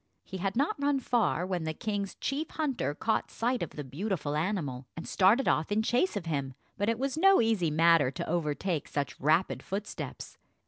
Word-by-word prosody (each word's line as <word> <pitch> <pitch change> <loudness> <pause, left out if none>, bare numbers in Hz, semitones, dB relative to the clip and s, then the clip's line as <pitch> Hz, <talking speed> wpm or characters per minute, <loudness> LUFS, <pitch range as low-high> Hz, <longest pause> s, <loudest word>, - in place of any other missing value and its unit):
He 190 - -7
had 195 +1 -2
not 285 - 0
run 280 -1 +2
far 230 -9 +1
when 180 -3 -2
the 160 0 -3
king's 205 0 -3
chief 290 +3 -2
hunter 275 - -2
caught 220 +7 0
sight 245 +2 -1
of - - -2
the 150 - -7
beautiful 150 - -3
animal, 150 -7 -2
and 165 - -6
started 210 +8 +4
off 160 +5 +1
in 215 +2 +2
chase 245 - +1
of 185 - -5
him; 140 -5 -2 0.2
but 205 +1 0
it 230 - +1
was 275 +4 -2
no 390 +2 +6
easy 220 -8 +2
matter 165 -2 +4
to 130 - -5
overtake 165 0 -1
such 145 -3 -3
rapid 155 +6 +2
footsteps. 200 +2 -6
190 Hz, 190 wpm, -30 LUFS, 155-230 Hz, 0.2 s, no